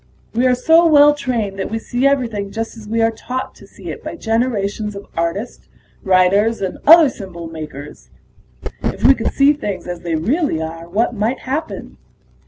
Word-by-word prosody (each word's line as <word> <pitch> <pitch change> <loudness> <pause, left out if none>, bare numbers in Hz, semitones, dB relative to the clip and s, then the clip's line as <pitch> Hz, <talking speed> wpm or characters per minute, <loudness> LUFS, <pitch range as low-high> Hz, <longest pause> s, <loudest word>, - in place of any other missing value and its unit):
We 245 +3 +2
are 250 - +3
so 320 +7 +4
well 295 -1 +6
trained 230 -9 -3
that 190 - -3
we 225 - -2
see 245 +4 0
everything 230 -8 -1
just 225 +2 -5
as 220 -2 -12
we 225 +1 +1
are 225 - +3
taught 255 +3 -5
to - - -17
see - - -9
it - - -9
by - - -6
generations 220 -3 -1
of 200 - -8
artists, 170 +8 -3 0.3
writers, 195 +4 +3
and 190 -2 -4
other 330 0 +9
symbol 190 -9 -8
makers. 150 -3 -9 0.7
If - - -3
we 270 - +7
could 230 -4 -2
see 280 +1 +4
things 205 - -5
as 175 -1 -5
they 170 -1 -3
really 240 - 0
are, 165 +1 -6
what 225 +6 0
might 225 +4 -2
happen?" 295 +5 -5
225 Hz, 185 wpm, -18 LUFS, 185-255 Hz, 0.7 s, other